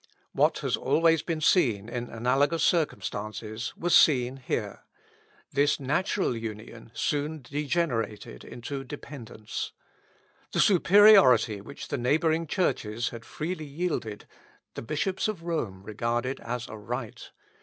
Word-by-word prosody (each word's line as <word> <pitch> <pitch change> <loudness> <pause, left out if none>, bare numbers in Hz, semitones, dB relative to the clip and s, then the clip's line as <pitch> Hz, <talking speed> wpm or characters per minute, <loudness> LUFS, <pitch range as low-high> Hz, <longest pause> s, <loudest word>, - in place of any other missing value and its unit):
What - - +2
has - - +2
always 165 -1 +3
been 165 -2 -3
seen 115 - +3
in 120 0 -5
analogous 140 +7 +1
circumstances 110 - -1
was 175 0 +2
seen 130 -6 +4
here; 110 -6 -3 0.7
this 145 +2 +2
natural 150 +2 0
union 115 0 -7
soon 150 0 -2
degenerated 130 - -2
into 135 +3 -6
dependence. 125 -6 -7 0.8
The - - 0
superiority 180 - +6
which 140 +8 -9
the 140 - -2
neighbouring 160 +6 +1
churches 120 - -1
had 115 -1 -9
freely 155 0 -4
yielded, 140 -8 -3 0.5
the - - -6
bishops 170 - -1
of 205 -6 -4
Rome 115 - -3
regarded 120 +5 -2
as 120 0 -4
a 110 - -8
right. 115 +2 -6
135 Hz, 120 wpm, -27 LUFS, 115-160 Hz, 0.8 s, superiority